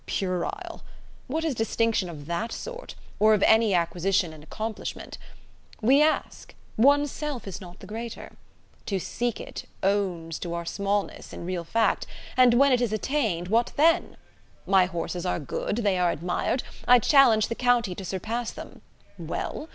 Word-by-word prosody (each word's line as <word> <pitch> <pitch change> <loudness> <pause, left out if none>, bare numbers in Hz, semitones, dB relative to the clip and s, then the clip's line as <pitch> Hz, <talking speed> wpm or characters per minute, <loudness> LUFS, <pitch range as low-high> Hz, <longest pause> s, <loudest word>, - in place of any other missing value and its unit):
Puerile! 185 -2 -3 0.5
What 315 +5 -2
is 315 - 0
distinction 225 -4 0
of 150 -4 -9
that 170 +8 -3
sort, - - -7 0.2
or 215 +1 +6
of 200 - 0
any 220 -3 +5
acquisition 175 0 +1
and 155 - -12
accomplishment? 215 +7 -6 0.6
We 265 +6 +5
ask! 310 +1 0 0.2
one's 285 +4 +4
self 295 -8 -5
is 195 - -6
not 180 -1 -12
the - - -10
greater. 230 +2 -7 0.6
To 195 - 0
seek 240 +5 -2
it, - - -7 0.2
owns 185 -5 0
to 170 -1 -4
our 170 0 -4
smallness, 200 +2 -2
in - - -7
real 180 -1 -3
fact; 225 +6 +1 0.3
and 250 -2 +6
when 275 +2 +5
it 250 -1 +3
is 240 -3 0
attained, 215 - -1
what 230 +3 +2
then? 330 +4 +3 0.5
My 190 -1 +5
horses 175 0 -4
are 180 - 0
good, 150 +6 -3
they 190 -3 +2
are 180 -1 +3
admired, 175 - -1 0.2
I 250 - +8
challenge 240 -3 +5
the - - -2
county 240 -5 +2
to 190 - -7
surpass 220 +6 -3
them: - - -10 0.4
well? 315 - -4
215 Hz, 160 wpm, -26 LUFS, 180-245 Hz, 0.6 s, I